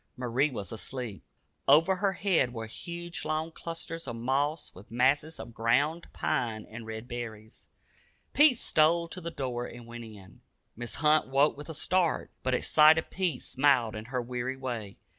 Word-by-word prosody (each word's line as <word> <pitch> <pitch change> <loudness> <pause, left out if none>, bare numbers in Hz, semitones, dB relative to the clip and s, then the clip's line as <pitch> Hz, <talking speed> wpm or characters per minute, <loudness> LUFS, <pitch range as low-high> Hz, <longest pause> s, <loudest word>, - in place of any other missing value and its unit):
Marie 125 +4 +1
was 110 -6 -6
asleep. 115 -2 -5 0.4
Over 175 +5 +6
her 195 0 +1
head 180 -10 +1
were 115 -1 -4
hung 170 +8 -6
long 155 +1 -1
clusters 165 -1 -6
of 120 - -4
moss, 140 +6 -1
with 95 +3 -14
masses 140 +7 +1
of 120 - -8
ground 140 +9 +1
pine 115 -4 -1
and 110 0 -9
red 110 +1 -6
berries. 110 -3 -7 0.7
Pete 295 -5 +6
stole 170 -2 +3
to 185 - -5
the 170 - -4
door 125 -6 -3
and 120 0 -10
went 120 0 -8
in. 100 -4 -13 0.3
Mrs. 120 0 -5
Hunt 150 -1 +4
woke 135 +3 +3
with 145 +3 -9
a 160 - -5
start, 180 +1 +1
but 130 0 +1
at - - -1
sight 155 +1 +7
of 160 - -2
Pete 180 -8 -1
smiled 130 -5 +2
in 110 0 -6
her 125 0 -2
weary 125 +2 -3
way. 120 -6 -5
130 Hz, 175 wpm, -29 LUFS, 115-160 Hz, 0.7 s, sight